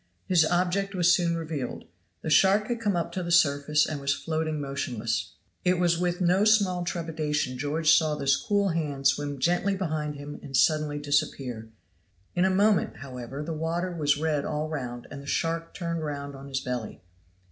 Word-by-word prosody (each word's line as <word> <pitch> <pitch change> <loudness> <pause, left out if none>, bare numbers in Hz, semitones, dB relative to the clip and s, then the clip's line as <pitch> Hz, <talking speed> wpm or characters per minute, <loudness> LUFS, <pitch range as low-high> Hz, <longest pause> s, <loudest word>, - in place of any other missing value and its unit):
His 175 -4 +4
object 185 +3 0
was 175 -1 +5
soon 170 -2 +1
revealed; 155 -6 -4 0.4
the 160 - -2
shark 200 +6 +4
had 240 -1 -1
come 205 -4 +1
up 170 - -1
to 185 - -3
the 170 -1 -4
surface 150 -3 +4
and 150 -2 -4
was 140 0 +1
floating 155 -1 -2
motionless. 115 -7 -3 0.3
It 180 0 +3
was 170 -1 +2
with 175 0 0
no 180 +3 +3
small 200 -5 +3
trepidation 155 -6 -2
George 155 +4 +2
saw 155 -2 +3
this 140 -1 +2
cool 200 -1 +1
hand 150 -5 -3
swim 145 0 0
gently 175 +7 +1
behind 155 -5 -2
him 145 +1 -8
and 135 -1 -2
suddenly 155 -1 +2
disappear; 145 -6 -1 0.6
in 180 +1 +2
a - - +4
moment, 200 0 +2
however, 130 +1 -7
the 165 +2 -4
water 165 +3 -2
was 145 -3 +2
red 150 -2 0
all 150 0 -2
round, 125 -6 -5
and 140 - -7
the 140 - -12
shark 165 +2 -1
turned 170 -2 -3
round 140 -1 -4
on 135 +1 -10
his 135 -1 -2
belly. 125 -7 -5
155 Hz, 180 wpm, -27 LUFS, 140-175 Hz, 0.6 s, was